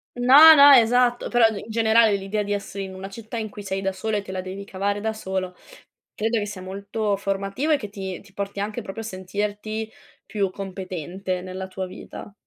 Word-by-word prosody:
No, 275 +6 +9
no, 285 -1 +9
esatto, 245 0 +4
però 240 -2 +5
i 220 -3 -4
in 225 - -9
generale 220 -1 +4
l'idea 195 +2 -2
di 205 0 -2
essere 200 -1 -5
in 190 -1 -8
una 190 +1 -8
città 225 +3 -8
in 220 -1 -3
cui 205 0 -10
sei 195 0 -3
da 195 - -1
sola 210 +2 -2
e - - -2
te 195 -1 -9
la 185 - -3
devi 190 +2 -7
cavare 200 +1 -2
da 220 - -1
solo, 190 -4 -4 0.6
credo 225 +1 0
che 205 - -3
sia 200 -3 -8
molto 200 +2 -2
formativo 195 +9 -2
e - - +4
che 210 -7 -7
ti 190 -2 -6
ti 200 -1 -19
porti 200 0 -5
anche 210 +3 -3
proprio 210 +2 -7
a - - -8
sentirti 210 +3 -4 0.3
più 200 -3 -1
competente 185 -1 -5
nella 185 +1 -6
tua 190 0 -5
vita. 185 +2 -10
200 Hz, 210 wpm, -23 LUFS, 190-220 Hz, 0.6 s, No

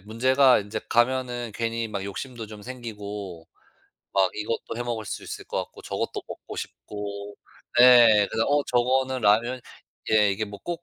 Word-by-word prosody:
문제가 130 +5 +4
인제 105 +2 -4
가면은 120 -1 +1
괜히 115 0 -2
막 105 -3 -4
욕심도 115 +4 -6
좀 105 -1 -11
생기고 105 -8 -7 0.7
막 95 -2 +3
이것도 110 +1 -4
해 120 - -2
먹을 115 -3 -3
수 100 - -5
있을 - - -7
것 - - -3
같고 - - -16
저것도 - - -3
먹고 - - -9
싶고 100 0 -7 0.4
네 120 -4 +8
그래서 110 0 0
어 145 0 +3
저거는 130 +1 +2
라면 115 +4 +2 0.5
예 105 -2 +5
이게 110 +2 -2
뭐 100 -1 -10
꼭 175 -1 -4
115 Hz, 295 characters per minute, -25 LUFS, 105-125 Hz, 0.7 s, 네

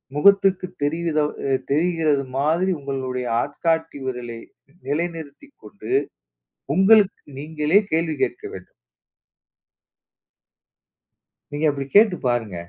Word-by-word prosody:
முகத்துக்கு 195 +2 +4 0.2
தெரியுதோ, 155 0 0 0.2
அ - - 0 0.2
தெரிகிறதுமாதிரி 155 +1 +1
உங்களுடைய 130 -2 -4
ஆட்காட்டி 160 +1 -2
விரலை 120 -3 -5 0.5
நிலைநிறுத்திக்கொண்டு, 165 - -6 0.8
உங்களுக்கு 200 +1 +5 0.2
நீங்களே 150 +4 +1
கேள்வி 160 0 +1
கேட்க 120 - -2
வேண்டும். 95 -1 -11 2.8
நீங்க 145 +2 -1
அப்டி 140 -1 -5
கேட்டு 210 -2 +6
பாருங்க. 115 -6 -1
155 Hz, 80 wpm, -22 LUFS, 140-175 Hz, 2.8 s, கேட்டு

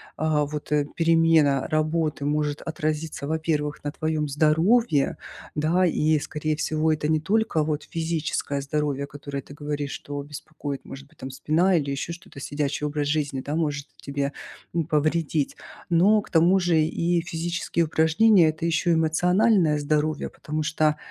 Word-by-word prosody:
а, 155 -1 +1
вот 150 0 -6 0.3
перемена 165 -4 +3
работы 155 -1 0
может 150 0 -1
отразиться, 155 -2 -3
во-первых, 155 -2 -1
на 145 - -2
твоем 155 -1 -2
здоровье, 160 - +2 0.4
да, 165 +5 +2
и, 155 -2 +2
скорее 155 +1 -2
всего, 155 0 +1
это 150 0 -2
не 155 -1 +3
только 205 -1 +1
вот 150 -1 -2
физическое 160 -3 -2
здоровье, 140 -1 -1
которое, 140 -1 -6
ты 140 - -13
говоришь, 145 -1 -4
что 145 0 -6
беспокоит, 145 -1 -7
может 140 +1 -10
быть, - - -26
там 130 - -7
спина 160 +7 +2
или 140 -3 0
еще 145 +5 -3
что-то, 170 -5 -12
сидячий 145 +1 -2
образ 145 -1 -2
жизни, 145 -3 -1
да, 145 +3 -4
может 145 -3 -1
тебе, 140 0 -3 0.4
м, 165 -3 0
повредить, 155 -1 0 0.3
но 200 +5 +4
к - - -15
тому 175 +3 +4
же 175 -2 +2
и 170 +2 +1
физические 170 0 -2
упражнения- 165 +4 +4
это 155 +2 -4
еще 170 +1 +2
эмоциональное 170 +1 +3
здоровье, 150 +1 0
потому 155 +1 -5
что, 155 -1 +1
155 Hz, 150 wpm, -25 LUFS, 145-165 Hz, 0.4 s, но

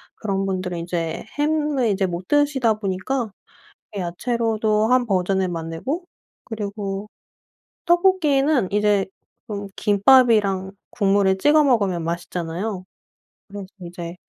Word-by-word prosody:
그런 195 -2 -2
분들은 185 -2 -3
이제 170 -1 -3
햄을 295 -4 +1
이제 195 0 +1
못 180 0 -5
드시다 285 -6 +2
보니까 215 +4 -3 0.7
야채로도 215 +3 0
1 250 0 +3
버전을 190 -1 +1
만들고 165 - -4 0.4
그리고 205 -2 -5 0.8
떡볶이는 310 - +3
이제 210 -1 +2 0.4
좀 200 -1 -5
김밥이랑 205 -3 +4 0.2
국물을 195 -2 +2
찍어 300 +6 +4
먹으면 200 -10 +1
맛있잖아요. 175 +3 -4 0.7
그래서 200 -1 -7 0.2
이제 170 0 -7
205 Hz, 250 characters per minute, -22 LUFS, 185-245 Hz, 0.8 s, 김밥이랑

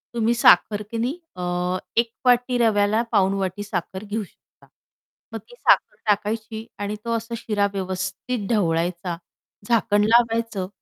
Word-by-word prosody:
तुम्ही 230 0 +2
साखर 210 -1 +5
की 230 - -3
नाही 255 +9 -2 0.2
अ, 180 0 -1 0.2
1 230 0 +2
वाटी 245 0 +3
रव्याला 215 -1 +3
पाऊण 195 -3 +3
वाटी 190 +2 -3
साखर 190 0 -4
घेऊ 215 +1 -3
शकता. - - -21 0.7
मग - - -2
ती 485 - -14
साखर - - +3
टाकायची 220 +2 -1
आणि 205 +1 -3
तो 230 - -2
असा 230 +1 -7
शिरा 210 -2 0
व्यवस्थित 190 +4 -3
ढवळायचा 175 -3 0 0.5
झाकण 210 -3 +3
लावायचं, 230 -4 +2
210 Hz, 140 wpm, -23 LUFS, 190-230 Hz, 0.7 s, साखर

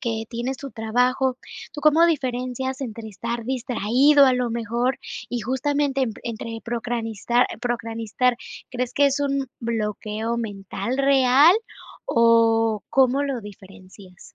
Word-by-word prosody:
que 225 -2 -3
tienes 245 +3 -3
tu 275 - -7
trabajo, 250 +3 0 0.3
tú 295 - -7
cómo 310 +3 +5
diferencias 260 -3 -2
entre 230 -3 -6
estar 235 +3 -5
distraído 260 +3 +3
a 260 - +4
lo 250 -1 0
mejor? 235 +3 -1 0.3
Y 245 - -3
justamente 270 +3 0
en 250 - 0
entre 225 -1 -6
procastinar, 235 0 -1 1.2
¿crees 250 -1 -3
que 285 0 +4
es 280 +1 +1
un 275 -2 -1
bloqueo 220 0 -3
mental 220 +2 -4
real, 275 +5 +5 0.5
o 225 -2 +3
cómo 270 +1 +3
lo 270 -4 -3
diferencias? 190 -2 -14
245 Hz, 120 wpm, -23 LUFS, 225-265 Hz, 1.2 s, cómo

